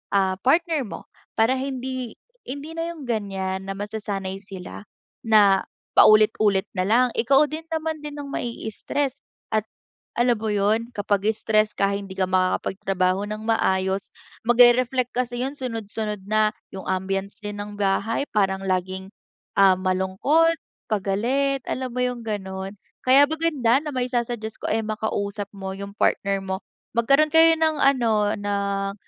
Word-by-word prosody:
ah, 190 -1 +3
partner 320 +2 +2
mo. - - -8 0.3
Para 225 +4 +4
hindi 260 -3 -4 0.3
hindi 285 +5 -6
na 330 +1 -3
yung 300 -5 -10
ganyan 195 -4 -3
na - - -1
masasanay 200 -2 -4
sila 190 -2 -9 0.4
na 205 -4 +5 0.3
paulit-ulit 215 -2 +5
nalang. 225 +7 +2
Ikaw 270 +6 +4
din 315 +2 -6
naman 320 -1 -3
din 295 0 -6
ang 285 -1 -6
mai-stress, 245 +4 -3 0.4
at 215 0 +1 0.5
alam 240 0 +3
mo 220 - -1
yun 215 +3 +1
kapag 205 -1 0
stress 215 -1 +2
ka 200 - +3
hindi 195 -1 -7
ka 190 - +2
makakapagtrabaho 185 +1 0
ng 215 +1 -5
maayos, 190 -3 +1 0.4
magre-reflect 245 +1 +4
kasi 245 -1 -1
yung 275 - -4
sunod-sunod 215 -4 -4
na. 215 0 +3 0.3
Yung 190 - -7
ambiance 195 +1 -2
din 205 0 -4
ng 205 0 -8
bahay 200 +6 0
parang 195 -2 +1
laging 190 +1 -2 0.5
ah, 195 -1 +6
malungkot, 190 - +2 0.3
pagalit, 240 +8 0
alam 255 -1 -3
mo 250 - -1
yung 250 -1 -2
ganun? 195 -2 -4 0.3
Kaya 270 +3 +7
maganda 295 -6 +2
na 300 - -4
maisa-suggest 240 -3 -2
ko - - -6
ay 220 0 +1
makausap 205 -1 -3
mo 190 -1 -5
yung 200 +1 -7
partner 195 -2 +1
mo. 190 0 -3 0.4
Magkaroon 275 +6 +4
kayo 325 0 +7
ng 315 -1 +2
ano, 225 -6 +3
ng 200 -1 -2
215 Hz, 140 wpm, -24 LUFS, 195-255 Hz, 0.5 s, Kaya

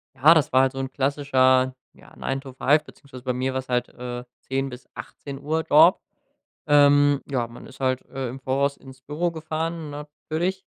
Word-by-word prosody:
Ja, 145 +5 +7
das 155 -2 +1
war 130 - +5
halt 135 0 +1
so 135 - -6
'n 135 0 -4
klassischer, 130 -2 +2 0.2
ja, - - -19
9-to-5 135 +2 0
beziehungsweise 135 -4 -14
bei 130 -1 -1
mir 130 +1 -2
war 130 - -1
es 130 - -10
halt, 125 -1 0
äh, 125 0 -7 0.2
10:00 135 +1 -2
bis 125 0 -11
18:00 145 +3 -5
Job. 160 +5 +7 0.7
Ähm, 145 -1 +5
ja, 125 -3 0
man 115 +1 -12
ist 130 - -14
halt, 130 -1 0
äh, 130 -2 -5
im 130 +3 -8
Voraus 140 +2 0
ins 130 -1 -14
Büro 155 +6 -2
gefahren 160 0 -4
natürlich, 155 +5 -4
135 Hz, 180 wpm, -24 LUFS, 130-150 Hz, 0.7 s, Ja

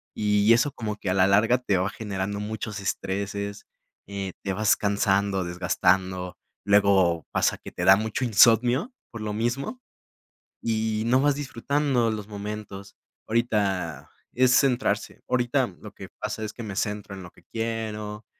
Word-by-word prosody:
Y 105 +1 +3
eso 125 +5 +2
como 110 -5 -4
que 100 - -4
a - - +2
la 95 -1 +4
larga 110 +6 +4
te 100 -6 0
va 95 +2 0
generando 100 -1 -4
muchos 105 0 -5
estreses, 100 +1 -3 0.4
eh, 100 -2 -5
te 95 - -1
vas 105 +2 +3
cansando, 100 -1 +1
desgastando, 90 +1 0 0.3
luego 100 -5 +3
pasa - - +1
que - - -10
te - - -3
da 95 - +9
mucho 110 +4 -2
insomnio 120 - +4 0.2
por 115 -3 -7
lo 105 -1 -3
mismo 120 - -2 0.8
y 110 -1 -1
no 130 +2 +4
vas 145 -1 +3
disfrutando 135 -3 0
los 105 -2 -5
momentos. 100 -1 -7 0.3
Ahorita 100 - -1 0.2
es 130 0 +4
centrarse 130 -2 +1
ahorita 125 +1 +1
lo - - -9
que - - -10
pasa 110 - -4
es 110 - -5
que 120 - -9
me 105 -3 -6
centro 105 -1 -3
en 95 - -9
lo 90 - -11
que - - -22
quiero, 110 -2 -4
105 Hz, 155 wpm, -25 LUFS, 100-115 Hz, 0.8 s, da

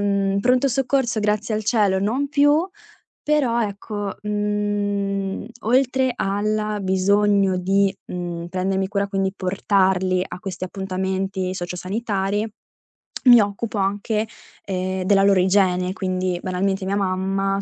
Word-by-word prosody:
In 200 -1 +1
pronto 250 +4 +3
soccorso 250 -2 0
grazie 210 +1 0
al 215 - -1
cielo 205 -4 +2
non 250 +8 0
più. 290 +4 +3 0.6
Però, 265 -6 +2
ecco, 205 -1 -4
mhmm, 205 -1 -1 0.2
oltre 260 +2 +2
alla 210 +1 -1
bisogno 195 0 +2
di, 195 +2 +2
mhmm, 175 -1 -5
prendermi 190 +1 -1
cura, 200 0 -1
quindi 195 -1 -1
portarli 185 -1 +1
a - - -8
questi 185 -1 -6
appuntamenti 190 0 -3
socio-sanitari, 195 +3 -2 0.8
mi 245 -2 +9
occupo 205 +2 -3
anche, 205 +3 -1 0.4
ehm, 185 -1 -2
della 195 +1 +4
loro 195 -2 +4
igiene, 185 -1 +2
quindi 185 -3 -2
banalmente 190 +1 -1
mia 200 +1 0
mamma 195 +1 0
200 Hz, 120 wpm, -22 LUFS, 190-210 Hz, 0.8 s, mi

